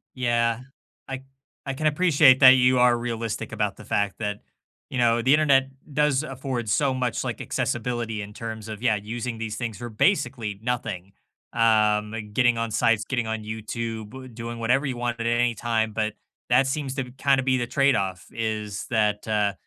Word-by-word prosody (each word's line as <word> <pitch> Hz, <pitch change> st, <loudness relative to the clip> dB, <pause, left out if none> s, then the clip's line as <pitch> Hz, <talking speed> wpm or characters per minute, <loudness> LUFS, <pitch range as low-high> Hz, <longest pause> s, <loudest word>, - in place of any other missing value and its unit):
Yeah. 120 Hz, -2 st, +1 dB, 0.5 s
I 135 Hz, 0 st, -6 dB, 0.4 s
I 135 Hz, -, -2 dB
can 155 Hz, +3 st, 0 dB
appreciate 150 Hz, -4 st, +5 dB
that 130 Hz, 0 st, +11 dB
you 125 Hz, -1 st, +4 dB
are 125 Hz, -1 st, +5 dB
realistic 115 Hz, -2 st, -4 dB
about -, -, -2 dB
the -, -, -12 dB
fact 105 Hz, -1 st, 0 dB
that, 105 Hz, -1 st, -3 dB, 0.5 s
you 130 Hz, -, -4 dB
know, 120 Hz, -1 st, +3 dB
the 130 Hz, +4 st, +4 dB
Internet 140 Hz, -3 st, +4 dB, 0.2 s
does 150 Hz, -1 st, +2 dB
afford 130 Hz, -5 st, -4 dB
so 140 Hz, +3 st, +2 dB
much, 125 Hz, -3 st, -1 dB
like, -, -, -4 dB
accessibility 115 Hz, -2 st, -2 dB
in 100 Hz, +1 st, -8 dB
terms 110 Hz, -1 st, -6 dB
of, 110 Hz, 0 st, -7 dB
yeah, 115 Hz, -4 st, +3 dB
using 115 Hz, +3 st, -4 dB
these 110 Hz, -1 st, -4 dB
things 115 Hz, -4 st, -4 dB
for 120 Hz, 0 st, -6 dB
basically 120 Hz, -, 0 dB
nothing. 105 Hz, -6 st, -3 dB, 0.4 s
Um, 105 Hz, -2 st, +3 dB, 0.2 s
getting 120 Hz, 0 st, +3 dB
on 115 Hz, -1 st, -2 dB
sites, 110 Hz, 0 st, +2 dB
getting 120 Hz, -4 st, -2 dB
on 110 Hz, -1 st, -3 dB
YouTube, 115 Hz, +3 st, -6 dB
doing 115 Hz, 0 st, -6 dB
whatever 125 Hz, +5 st, +2 dB
you 125 Hz, -, -3 dB
want 120 Hz, -1 st, -2 dB
at 115 Hz, -, -1 dB
any 120 Hz, 0 st, +2 dB
time, 110 Hz, -1 st, -1 dB
but 110 Hz, -1 st, -1 dB, 0.4 s
that 125 Hz, +2 st, +5 dB
seems 135 Hz, -1 st, -3 dB
to 135 Hz, -, -1 dB
b 125 Hz, -, -13 dB
kind 135 Hz, -1 st, +3 dB
of 130 Hz, -, -2 dB
be 130 Hz, 0 st, +3 dB
the 120 Hz, -2 st, -2 dB
trade 140 Hz, -1 st, +3 dB
off, 95 Hz, -3 st, -2 dB
is 110 Hz, -3 st, -3 dB
that, 105 Hz, -2 st, 0 dB
uh, 105 Hz, -2 st, +1 dB
120 Hz, 185 wpm, -25 LUFS, 110-130 Hz, 0.5 s, that